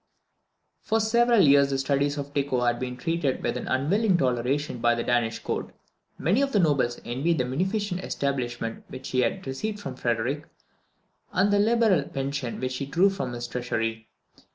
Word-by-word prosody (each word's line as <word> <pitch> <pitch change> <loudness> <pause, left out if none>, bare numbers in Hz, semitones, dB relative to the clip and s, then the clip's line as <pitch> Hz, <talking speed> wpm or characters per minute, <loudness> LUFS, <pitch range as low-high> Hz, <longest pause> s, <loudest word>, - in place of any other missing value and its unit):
For 225 - +1
several 235 +1 +4
years 140 0 +6
the 135 - 0
studies 140 +1 0
of 145 0 -5
Tycho 140 -3 0
had 120 -1 +1
been 125 -1 -4
treated 165 -3 -1
with - - 0
an - - -4
unwilling 180 - +2
toleration 130 +1 0
by 120 0 +3
the 120 - -2
Danish 120 -2 +1
Court. - - -4 0.5
Many 195 - +2
of 275 -1 0
the 205 - +4
nobles 140 -8 +2
envied 140 +8 0
the 125 - +1
munificent 185 - -1
establishment 120 -5 -3
which 130 - -8
he 130 - 0
had 190 +9 0
received 205 +11 -3
from 135 -9 -6
Frederick, 120 +5 -1 0.8
and 200 +3 +2
the 205 - +4
liberal 220 -5 +4
pension 140 -2 -4
which 130 0 -2
he 140 - -4
drew 185 +7 +3
from 185 -10 -4
his 120 0 -4
treasury. 115 -2 -3
140 Hz, 175 wpm, -26 LUFS, 125-185 Hz, 0.8 s, years